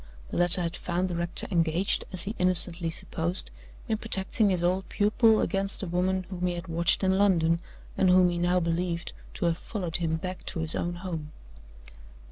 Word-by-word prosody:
The - - -4
letter 175 +1 +6
had 170 +1 -3
found 180 +1 -2
the 175 - -3
rector 170 0 -3
engaged, 170 +2 +1
as 185 -2 +3
he 210 - -4
innocently 180 -2 +1
supposed, 165 +2 -2 0.4
in 220 -1 -1
protecting 210 0 +1
his 180 -2 0
old 185 +2 0
pupil 215 +1 +3
against 195 0 -1
the - - -2
woman 185 +2 -1
whom 180 -1 -2
he 175 - -2
had 175 +2 -7
watched 170 +4 +2
in 190 0 +2
London, 170 -5 +3 0.4
and 190 - +2
whom 180 -1 +5
he 175 - -3
now 175 +1 +2
believed 170 0 -2 0.2
to - - -2
have 170 0 0
followed 180 -7 0
him 165 -2 -1
back 185 +3 -6
to - - -2
his 160 0 0
own 175 0 -3
home. 165 -4 -6
180 Hz, 190 wpm, -27 LUFS, 170-190 Hz, 0.4 s, letter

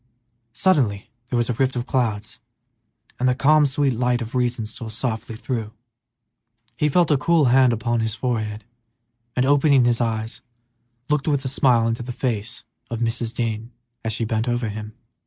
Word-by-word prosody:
Suddenly 125 - +1 0.2
there 125 - 0
was 120 - +1
a 125 - 0
rift 130 +3 0
in 120 - -1
the - - -24
clouds, 115 -3 -2 0.8
and 130 +1 +2
the 125 - +2
calm, 150 +2 +4
sweet 140 0 +1
light 125 +1 +1
of 115 0 -6
reason 125 -3 0
stole 110 +1 -6
softly 115 0 -3
through. 110 -2 -4 1.0
He 150 - +1
felt 170 +2 +3
a 145 - +4
cool 160 +2 +3
hand 130 -4 +4
on 120 -1 +1
his 110 -1 -1
forehead, 110 -3 -2 0.7
and, 125 - +2
opening 140 -2 +4
his 120 0 +2
eyes, 110 0 -2 0.7
looked 150 -1 0
with 140 -3 +1
a - - +1
smile 125 -3 +3
into 115 +1 -2
the 120 +1 -5
face 115 -2 -3 0.3
of 115 - -3
Mrs. 115 0 -1
Dean 115 0 -3 0.3
as 115 - -1
she 115 +1 -1
bent 110 +2 -1
over 120 -2 -1
him. 105 +1 -7
120 Hz, 175 wpm, -22 LUFS, 110-130 Hz, 1.0 s, calm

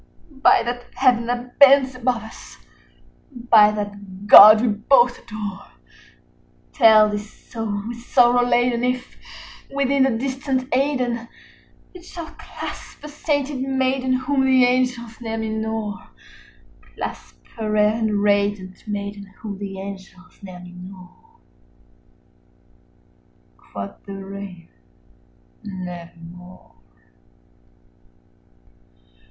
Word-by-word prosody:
By - - +5
that 245 +1 -5
Heaven 245 -3 +2
that 245 0 -5
bends 275 -1 +6
above 250 -2 -2
us, 220 - -13 0.7
by 235 -4 +4
that 205 -2 -7
God 215 +1 +10
we 245 - +1
both 240 +4 +2
adore, 210 -4 -7 1.1
Tell 220 -5 +6
this 210 0 -5
soul 215 -4 -6
with 235 0 -7
sorrow 245 0 +3
laden 245 0 +1
if, 250 0 -2 0.6
within 275 0 0
the 265 - +4
distant 260 +2 -2
Aidenn, 250 -4 -1 0.7
It 360 -2 -13
shall 340 -2 -9
clasp - - -9
a - - -7
sainted 290 -2 -2
maiden 265 -1 0
whom 265 +1 0
the 260 -1 +4
angels 245 -2 -1
name 225 -1 -4
Lenore: 220 -2 -4 0.7
Clasp - - -8 0.2
a 215 -1 -3
rare 210 0 +3
and 215 -2 -1
radiant 205 -1 -1
maiden 200 -1 -5 0.2
whom 205 -3 -7
the 195 -1 -6
angels 190 -2 -11
name 185 -2 -11
Lenore." 180 0 -14 2.2
95 - - -27
Quoth 100 0 -8
the 200 - -7
Raven, 195 -3 -9 1.0
"Nevermore." 180 -2 -10
225 Hz, 105 wpm, -21 LUFS, 200-255 Hz, 2.2 s, God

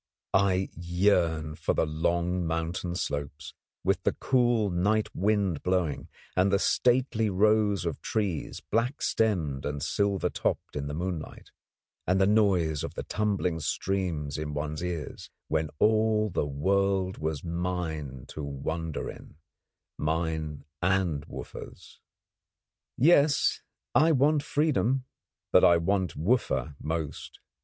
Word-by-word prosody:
I 95 -1 +2
yearn 85 -3 +1
for - - -1
the - - +2
long 85 +3 0
mountain 85 +2 -2
slopes, 70 -4 -4 0.3
with - - +1
the - - +1
cool 120 -5 +2
night 105 +5 +1
wind 100 -5 +1
blowing; 90 -5 0 0.3
and 95 +1 +3
the 100 - +4
stately 120 0 +2
rows 105 -1 +3
of 80 -3 -3
trees, 100 -8 -2
black 120 +6 0
stemmed 80 -12 0
and 70 -2 -3
silver 100 -2 0
topped - - -2
in 70 -1 -3
the 75 - -4
moonlight; 85 -1 -5 0.6
and 90 +2 +3
the 95 - +5
noise 95 -8 +2
of - - -5
the - - -4
tumbling 100 -5 -1
streams 80 -4 -2
in 75 -1 -4
one's 75 +1 -3
ears, 85 -4 -5 0.2
when 80 0 0
all 110 0 +3
the 75 - 0
world 95 +5 +1
was 80 -2 -2
mine 85 -6 -3
to 75 - -6
wander 80 +3 -4
in - - -10 0.6
mine 80 -2 -2 0.2
and 90 -5 +1
Wooffa's. - - -10 1.0
Yes, 145 0 +4 0.3
I 160 +2 +5
want 145 +2 +3
freedom; 140 -4 +1 0.5
but - - +6
I 85 - +7
want 95 +1 0
Wooffa 75 - 0
most. 80 -1 -4
90 Hz, 125 wpm, -28 LUFS, 80-105 Hz, 1.0 s, I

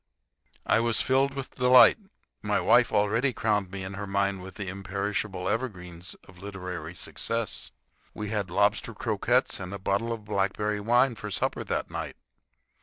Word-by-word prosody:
I - - +4
was 115 -1 +2
filled 135 +1 +2
with 135 -1 -6
delight. 125 - +7 0.4
My - - +1
wife - - +4
already 115 +6 +2
crowned 105 -4 0
me 95 0 -6
in 95 +1 -6
her 100 0 -5
mind 100 -1 0
with 95 -1 -9
the 100 - -5
imperishable 100 0 -3
evergreens 90 -8 -4
of 95 -1 -16
literary 90 -4 -6
success. 115 +3 -2 0.5
We 105 -1 -4
had 105 -4 -1
lobster 100 +3 +1
croquettes - - +1
and 90 - -6
a 100 - -4
bottle 100 +4 -1
of 110 -2 -5
blackberry 105 +1 0
wine 120 +4 +3
for 105 -1 -7
supper 100 - -1
that - - -2
night. - - -4
100 Hz, 160 wpm, -27 LUFS, 95-115 Hz, 0.5 s, delight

